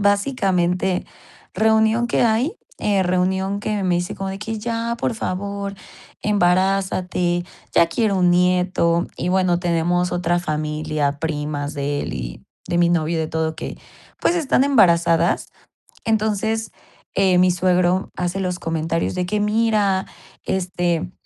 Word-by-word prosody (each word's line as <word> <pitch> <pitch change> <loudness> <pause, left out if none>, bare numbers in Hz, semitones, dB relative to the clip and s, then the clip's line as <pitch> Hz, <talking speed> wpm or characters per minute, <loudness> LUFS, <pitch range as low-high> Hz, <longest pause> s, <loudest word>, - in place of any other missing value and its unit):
Básicamente, 190 -4 +1 0.5
reunión 220 +3 +3
que 240 - +1
hay, 240 - +1 0.2
eh, 200 -2 +1
reunión 190 +2 0
que 210 -1 -2
me 180 -2 +2
dice 175 0 -3
como 195 0 -4
de 195 - -6
que: 220 +1 -4
"Ya, 230 +1 -2
por - - -1
favor, 200 0 -4 0.5
embarázate, 185 -2 +1 0.3
ya 170 - +6
quiero 205 +3 +1
un 180 -1 +3
nieto". 180 -1 +2
Y 175 - -2
bueno, 185 -1 +2
tenemos 175 0 +1
otra 175 0 0
familia, 150 -2 -2
primas 150 -2 -3
de 145 0 -2
él - - -4
y - - -7 0.2
de 175 - 0
mi 175 0 +4
novio, 165 -1 +1
de 160 - -1
todo 160 0 -1
que, - - -7 0.4
pues, 345 - +2
están 280 -5 +2
embarazadas. 170 -9 +3 0.6
Entonces, 220 0 0 0.4
eh, 190 -2 +3
mi 180 0 +5
suegro 180 +1 +1
hace 180 +1 -2
los 180 -2 -2
comentarios 165 0 -1
de 180 -1 -1
que: 210 +3 -1
"Mira, 210 -3 +2 0.4
este, 175 -2 -1
180 Hz, 140 wpm, -21 LUFS, 170-205 Hz, 0.6 s, ya